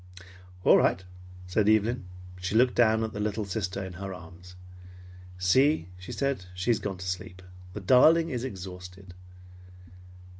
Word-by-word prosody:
"All - - +6
right," 95 - +1 0.4
said 100 +3 +1
Evelyn. 110 0 +2 0.3
She 95 +3 -3
looked 125 +2 +4
down 110 -2 +3
at 110 -1 -4
the 105 - -5
little 105 0 -2
sister 100 -1 -3
in 95 - -8
her 95 +1 -6
arms. 90 +1 -13 0.8
"See," 90 - +2
she 90 - -9
said, 140 -9 -2
"she 95 +6 0
has 115 - +1
gone 100 -2 -4
to 95 - -8
sleep. 90 0 -5 0.3
The 105 - -6
darling 160 - +5
is 125 -2 -3
exhausted." 90 -4 -8
100 Hz, 150 wpm, -27 LUFS, 90-115 Hz, 0.8 s, All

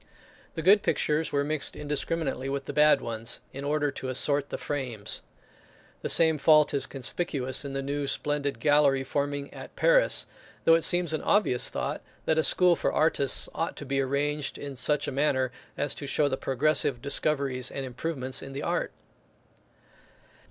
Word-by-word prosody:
The 160 - -4
good 200 +4 +6
pictures 155 +1 0
were 140 0 +1
mixed 150 0 -1
indiscriminately 145 -2 -3
with 140 0 -3
the - - -6
bad 150 0 +5
ones, 115 0 -5
in 140 - -6
order 145 0 0
to 130 -1 -6
assort 140 +2 +1
the - - -4
frames. 125 -8 -4 0.8
The - - -3
same 160 -2 +4
fault 150 0 +5
is 140 - -1
conspicuous 135 -1 -2
in 140 -1 -6
the 135 0 -3
new 140 +1 -3
splendid 145 0 -2
gallery 145 -3 +3
forming 145 +1 -3
at - - -11
Paris; - - +3 0.4
though 165 - +5
it 165 - +4
seems 175 -1 +3
an 155 - -1
obvious 195 - +1
thought - - -4 0.2
that 160 0 +2
a - - +2
school 180 +1 +4
for - - -1
artists 140 -4 +2
ought 165 - -3
to 145 - -8
be 135 0 0
arranged 140 +1 -2
in 140 -1 -7
such 145 +3 +1
a - - -2
manner, 130 -2 0 0.3
as 145 - -1
to 140 - -7
show 145 +2 +1
the 130 - -1
progressive 140 -1 +2
discoveries 140 -1 +1
and 135 - -5
improvements 130 0 -3
in 135 - -9
the 140 - -5
art. - - -1
145 Hz, 175 wpm, -27 LUFS, 135-155 Hz, 0.8 s, good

